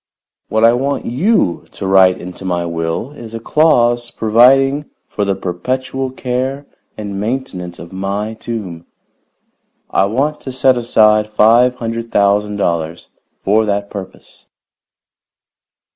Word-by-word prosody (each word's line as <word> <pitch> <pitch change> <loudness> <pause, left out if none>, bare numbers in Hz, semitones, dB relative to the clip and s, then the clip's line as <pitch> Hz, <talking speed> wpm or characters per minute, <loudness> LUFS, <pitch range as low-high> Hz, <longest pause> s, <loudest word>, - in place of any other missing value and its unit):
What 110 +1 +1
I 115 +1 +6
want 135 +3 -1
you 135 - +1
to - - -6
write 95 -1 +5
into 90 +2 -9
my 90 -2 -1
will 85 +8 -3
is 115 -6 -10
a - - -4
clause 120 -4 +2
providing 135 +6 +3 0.2
for 105 - -2
the 100 -1 0
perpetual 130 +9 -3
care 130 +2 -3 0.3
and 100 -2 -5
maintenance 105 -6 -4
of 85 +2 -11
my 100 +3 -3
tomb. 100 -8 -6 1.0
I 95 - +3
want 135 +9 -1
to 130 - -6
set 130 0 +3
aside 110 -3 +3
five 115 +4 +4
hundred 115 -1 -5
thousand 105 +1 +2
dollars 85 -4 -2 0.3
for 105 +3 +3
that 100 -1 -2
purpose." 100 -2 -10
110 Hz, 130 wpm, -16 LUFS, 95-125 Hz, 1.0 s, I